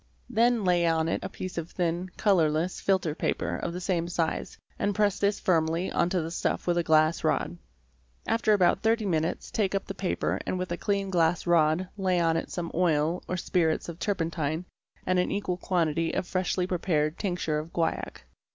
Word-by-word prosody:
Then 235 0 +3
lay 175 -2 +3
on 160 -1 +2
it - - -1
a - - -4
piece 185 -2 -5
of 165 0 -6
thin, 175 +1 -2
colourless, 170 -3 +2
filter 185 -5 +1
paper - - -1
of 170 - -3
the 175 - -5
same 175 -2 -1
size, 170 -2 -2 0.2
and 205 -1 0
press 205 -1 +2
this 200 0 +1
firmly 165 0 +1
on 170 - +1
to 180 -2 0
the 165 - -5
stuff - - -1
with 175 -1 +2
a - - +1
glass 155 0 +3
rod. - - 0 0.7
After 225 -1 +2
about 190 -1 +3
30 225 0 +2
minutes 165 -3 -1
take 200 -3 0
up 195 - -1
the 195 - -5
paper 190 -1 -1
and 185 - -2
with 185 -1 -4
a - - 0
clean 200 +1 -1
glass 170 -1 +2
rod 170 +1 +3
lay 185 -2 +2
on 165 -1 +2
it 165 - -2
some 170 -2 -4
oil 165 -1 +1
or 185 - -2
spirits 165 -2 0
of 170 0 -8
turpentine 165 -4 -1 0.4
and 185 0 +2
an 180 - 0
equal 195 -3 -1
quantity 165 -3 0
of - - -1
freshly 185 0 0
prepared 165 -4 0
tincture 175 -6 -1
of 160 +2 -8
guaiac. 165 -1 -2
175 Hz, 195 wpm, -28 LUFS, 165-190 Hz, 0.7 s, Then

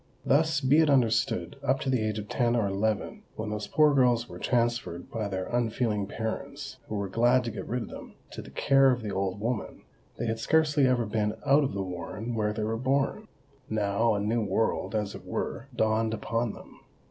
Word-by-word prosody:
Thus, 150 +1 +3
be 140 +3 +4
it 160 -2 +4
understood, 125 -1 +2
up 135 -1 +1
to 135 - -2
the 130 -3 +2
age 110 0 -1
of 105 -1 -5
ten 120 0 +1
or 115 -3 +2
eleven, 100 +2 -1
when 110 -1 -4
those 105 -1 -3
poor 150 -1 +4
girls 120 -3 +3
were - - -9
transferred 120 -8 -1
by 110 -2 -2
their 95 -2 -3
unfeeling 115 -3 0
parents 135 +6 -5
(who 110 - -4
were 100 -1 -2
glad 120 +5 +3
to 115 - -3
get 105 - -7
rid 125 0 -2
of - - -9
them) - - -10 0.2
to - - -7
the - - -12
care 135 0 +4
of 125 -2 0
the 105 - -3
old 95 0 -1
woman, 115 0 -3 0.3
they 120 - -2
had 115 0 -1
scarcely 150 +1 +3
ever 125 -2 +2
been 105 0 -1
out 145 +1 +5
of 135 - -2
the 100 - -1
warren 95 +6 -5
where 105 -2 0
they 105 0 -3
were 110 +1 -1
born. 135 - 0 0.4
Now 110 +1 +1
a - - 0
new 110 +3 0
world, 105 +2 0
as 105 -2 -1
it - - -9
were, 120 - -4
dawned 110 0 +1
upon 115 0 -2
them. - - -14
115 Hz, 210 wpm, -28 LUFS, 105-130 Hz, 0.4 s, out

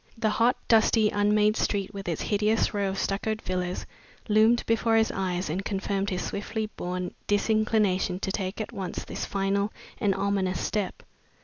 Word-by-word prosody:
The 220 -1 +1
hot, 235 +3 +3
dusty, 220 -1 +4
unmade 210 +1 +3
street, 200 -2 -1
with 195 -2 -5
its 165 - -2
hideous 215 +2 +1
rows 200 -2 0
of - - -6
stuccoed 215 +3 -1
villas, 180 -2 -3 0.4
loomed 220 +3 +4
before 230 0 +2
his 225 0 +3
eyes 185 -1 -2
and 180 +6 -2
confirmed 195 0 -1
his 180 -3 -2
swiftly 215 +2 -3
born 180 0 -3
disinclination 205 -3 +2
to 190 - -1
taking 195 +2 -2
at - - -10
once 190 -2 -4
this - - -4
final 200 +1 0 0.3
and 200 -2 +2
ominous 195 -1 0
step. 205 -3 -2
200 Hz, 165 wpm, -27 LUFS, 190-215 Hz, 0.4 s, dusty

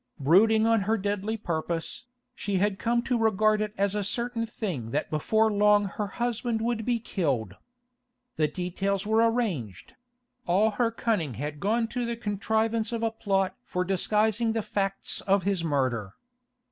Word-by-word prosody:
Brooding 215 +10 +5
on 225 -1 +3
her 225 - +3
deadly 205 +2 -2
purpose, 165 -2 -3 0.3
she 200 - -3
had 195 +1 +1
come 235 0 +1
to 245 -2 0
regard 215 -1 +3
it 210 0 -2
as 200 0 +1
a 210 -1 -1
certain 235 +2 -2
thing 175 - -4
that 145 +6 -2
before 220 +8 +2
long 205 0 +4
her 205 +1 -3
husband 235 +1 -2
would 225 -1 -1
be 245 -1 +2
killed. 140 - -2 0.8
The 155 -1 +2
details 190 +4 -2
were 225 +2 +4
arranged; 155 - -3 0.5
all 200 +5 +3
her 230 +3 +1
cunning 210 - -1
had 145 +4 -5
gone 225 +5 +1
to 250 0 -2
the 235 0 -3
contrivance 220 +2 0
of 230 -1 -2
a 225 - +1
plot 195 -4 0
for 180 0 -2
disguising 215 +4 +1
the 225 -1 -1
facts 195 -1 -2
of 195 -1 +3
his 195 -3 0
murder. 130 -10 -1
205 Hz, 160 wpm, -27 LUFS, 180-225 Hz, 0.8 s, Brooding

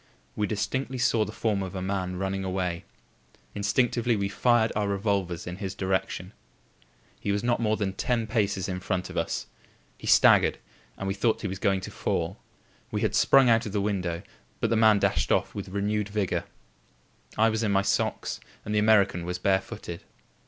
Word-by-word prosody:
We 105 - 0
distinctly 130 +6 -2
saw 115 -3 +2
the 105 - -6
form 110 -2 -1
of 95 0 -5
a - - -2
man 95 -1 -2
running 95 +1 -2
away. 90 -2 -2 0.7
Instinctively 115 +3 +1
we 100 -1 -1
fired 115 +2 +3
our 105 -1 0
revolvers 100 -4 -1
in 90 0 -6
his 95 -1 -5
direction. 95 0 -2 0.9
He 100 - -2
was 100 +2 -1
not 120 0 +1
more 110 -2 +1
than 95 -2 -1
ten 115 +3 0
paces 100 -4 0
in 90 -1 -3
front 90 -1 -2
of - - -10
us; - - -1 0.5
he - - -8
staggered - - +6 0.4
and 100 - -4
we 95 - 0
thought 105 +3 +1
he - - 0
was 95 0 -5
going 95 -1 +1
to - - -7
fall. - - -2 0.5
We - - -2
had - - +1
sprung 135 -2 +5
out 115 -1 +3
of 100 - -6
the 105 - +1
window, 95 -4 -2 0.4
but - - 0
the - - +3
man 110 -1 +6
dashed - - +1
off - - +1
with 100 -2 -6
renewed 105 +1 -1
vigour. 100 -3 -1 0.9
I 110 +1 +5
was 110 0 -1
in 110 -3 +1
my 100 0 +3
socks, - - -1 0.3
and 105 - -3
the 105 - +3
American 105 -5 +4
was 90 +1 -3
barefooted. 95 -2 -2
100 Hz, 190 wpm, -27 LUFS, 95-110 Hz, 0.9 s, staggered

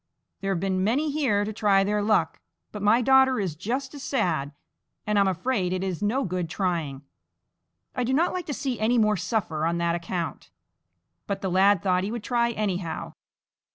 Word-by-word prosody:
There 195 0 -2
have 185 - 0
been 185 0 0
many 280 +9 +1
here 245 -9 +1
to 215 - -4
try 200 -2 +3
their 210 +1 0
luck, 215 +1 +1 0.3
but 210 - -7
my 220 +4 +4
daughter 265 0 +5
is 185 -7 -2
just 255 - -3
as 285 - -8
sad, 175 - -1 0.5
and 210 -1 +2
I - - +5
am 200 - +3
afraid 190 0 0
it 185 0 -2
is 185 -2 -3
no 230 +7 +1
good 180 -3 -3
trying. 165 -7 -2 0.9
I 250 - 0
do 245 - -1
not 320 +7 +2
like 365 -2 -4
to 295 - -2
see 260 -4 -3
any 230 +3 +2
more 215 -2 +3
suffer 185 -5 -2
on 170 +1 +1
that 170 0 +1
account." 170 -2 -4 0.8
But 195 -1 -3
the 190 - -2
lad 195 +1 +4
thought 185 -1 +2
he 195 - -2
would 235 -2 -5
try 235 -1 +1
anyhow. 195 -7 -3
205 Hz, 195 wpm, -26 LUFS, 180-240 Hz, 0.9 s, daughter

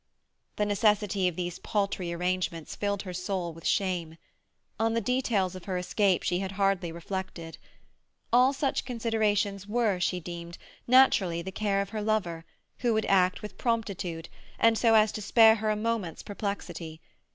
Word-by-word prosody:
The 210 - 0
necessity 205 -2 +2
of 180 - -2
these 175 0 -4
paltry 195 -4 -1
arrangements 175 -2 -2
filled 200 -1 -2
her 185 -2 -6
soul 180 -1 -3
with 165 0 -6
shame. 175 -4 -1 0.6
On 225 0 +1
the - - +3
details 225 -5 0
of 185 -1 -9
her 185 -2 -2
escape 185 +1 +1
she 175 0 0
had 195 0 -4
hardly 195 -3 +1
reflected. 170 -1 -6 0.7
All 250 +2 +6
such 275 0 -1
considerations 215 -4 0
were, 215 -4 +1
she 180 0 0
deemed, 170 0 -8 0.3
naturally 200 -10 +4
the 190 - -6
care 200 0 0
of 200 - -11
her 215 0 -4
lover, 185 -6 -1 0.3
who 240 -3 +1
would 220 - +1
act 185 -1 +2
with 210 - -8
promptitude, 195 -8 -2 0.3
and 230 0 +4
so 225 0 +4
as 215 -1 +5
to 215 - -5
spare 220 +1 +6
her 215 0 -1
a 215 - +2
moment's 215 -5 -2
perplexity. 200 -6 -5
195 Hz, 165 wpm, -28 LUFS, 180-220 Hz, 0.7 s, All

